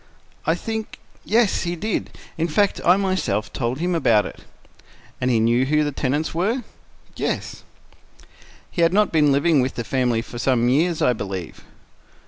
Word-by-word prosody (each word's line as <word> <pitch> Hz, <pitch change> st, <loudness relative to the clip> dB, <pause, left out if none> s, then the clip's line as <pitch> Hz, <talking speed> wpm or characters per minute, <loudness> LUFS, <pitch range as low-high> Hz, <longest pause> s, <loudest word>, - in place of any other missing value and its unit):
"I 165 Hz, -, +3 dB
think—yes, 220 Hz, +1 st, -2 dB
he 175 Hz, 0 st, -2 dB
did. 210 Hz, +5 st, -2 dB, 0.3 s
In 165 Hz, +1 st, -1 dB
fact, 200 Hz, +5 st, +1 dB
I 180 Hz, +2 st, +5 dB
myself 185 Hz, -, -1 dB
told 120 Hz, 0 st, -2 dB
him 175 Hz, +3 st, -1 dB
about 115 Hz, -, +3 dB
it." -, -, -8 dB, 0.8 s
"And 125 Hz, -, +1 dB
he 120 Hz, -3 st, +3 dB
knew 120 Hz, +3 st, +3 dB
who 150 Hz, +1 st, +2 dB
the 145 Hz, -, -1 dB
tenants 145 Hz, +3 st, -1 dB
were?" 215 Hz, +10 st, 0 dB, 0.5 s
"Yes." -, -, -3 dB, 1.1 s
"He 175 Hz, -, -2 dB
had 165 Hz, +1 st, +4 dB
not 210 Hz, +1 st, +3 dB
been 150 Hz, -3 st, +4 dB
living 145 Hz, +1 st, +3 dB
with 130 Hz, +1 st, -2 dB
the 120 Hz, -, -3 dB
family 120 Hz, -2 st, 0 dB
for 120 Hz, -, -9 dB
some 120 Hz, -2 st, +2 dB
years, 160 Hz, +5 st, +1 dB
I 125 Hz, -, +4 dB
believe?" 95 Hz, -6 st, -6 dB
150 Hz, 160 wpm, -22 LUFS, 120-175 Hz, 1.1 s, I